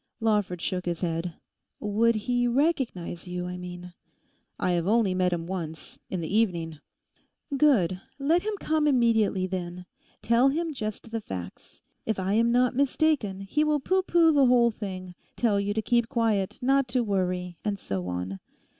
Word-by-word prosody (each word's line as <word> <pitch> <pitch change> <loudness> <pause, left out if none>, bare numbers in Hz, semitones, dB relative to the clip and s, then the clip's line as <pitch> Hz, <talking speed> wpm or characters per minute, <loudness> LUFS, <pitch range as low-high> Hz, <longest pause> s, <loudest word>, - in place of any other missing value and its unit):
_' - - -51 0.2
Lawford 210 -6 0
shook 180 -1 -2
his 170 -1 -2
head. 165 -1 -2 0.4
'Would 225 +3 +2
he 245 +3 0
recognise 240 - -1
you?... 180 0 -4
I 180 0 -5
mean...' 180 0 -8 0.7
'I 185 - +1
have 175 0 0
only 215 -3 +3
met 185 -1 +1
him 170 -1 -2
once—in 170 +1 -6
the 165 +5 -3
evening.' 170 -8 0 0.8
'Good; 200 - +3 0.2
let 310 +5 +2
him 425 +1 -2
come 310 -1 +1
immediately, 225 -8 +3
then. 180 -1 -5 0.4
Tell 235 +4 +4
him 325 +3 -1
just 215 -3 -5
the 225 -1 -2
facts. 90 - -8 0.2
If 220 - -1
I 190 +1 -1
am 230 +2 +3
not 250 +1 +3
mistaken, 275 -7 +1
he 295 +10 0
will 300 -1 +2
pooh 375 +7 +1
pooh 340 -3 +4
the 280 -3 +5
whole 240 -1 +5
thing; 185 -4 -6 0.2
tell 215 -4 +2
you 200 0 -1
to 220 +1 -1
keep 235 0 +2
quiet, 225 -7 0
not 270 +1 +3
to 245 0 +1
worry, 180 -4 -2
and 205 -1 -1
so 95 - -4
on. 90 +2 -4
210 Hz, 170 wpm, -27 LUFS, 180-250 Hz, 0.8 s, the